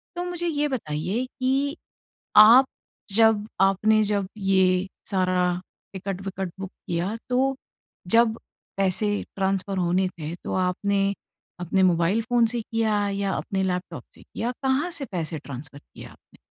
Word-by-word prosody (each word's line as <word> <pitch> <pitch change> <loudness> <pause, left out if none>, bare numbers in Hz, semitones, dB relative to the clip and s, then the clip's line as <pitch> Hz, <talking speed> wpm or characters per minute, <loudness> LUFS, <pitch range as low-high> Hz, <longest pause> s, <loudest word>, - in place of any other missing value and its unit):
तो 350 - -2
मुझे 350 -1 -3
ये 295 -2 0
बताइए 190 - -2
कि 270 +3 -1 0.6
आप 230 +5 +9 0.5
जब 220 -2 +4
आपने 210 +3 +4
जब 200 -2 -1
ये 190 -1 +2 0.2
सारा 180 -2 +1 0.3
टिकट-विकट 190 -1 -5
बुक 195 -1 -5 0.2
किया 175 +5 -2
तो 265 +2 +2 0.5
जब 230 +1 +4 0.4
पैसे 195 +2 +2 0.3
ट्रांसफर 195 0 -1
होने 180 +1 +1
थे। 155 +2 -5
तो - - -4
आपने 195 +2 0 0.5
अपने 180 +2 +1
मोबाइल 180 +4 +3
फ़ोन 240 0 +2
से 235 +1 -1
किया 215 -2 0
या 200 -1 -1
अपने 195 -2 -2
लैपटॉप 180 0 -3
से - - -17
किया? 240 +2 -4
कहाँ 270 +6 +1
से 300 -4 -3
पैसे 165 -2 -3
ट्रांसफर 140 0 -8
किया - - -13
आपने? - - -22
195 Hz, 140 wpm, -25 LUFS, 185-230 Hz, 0.6 s, आप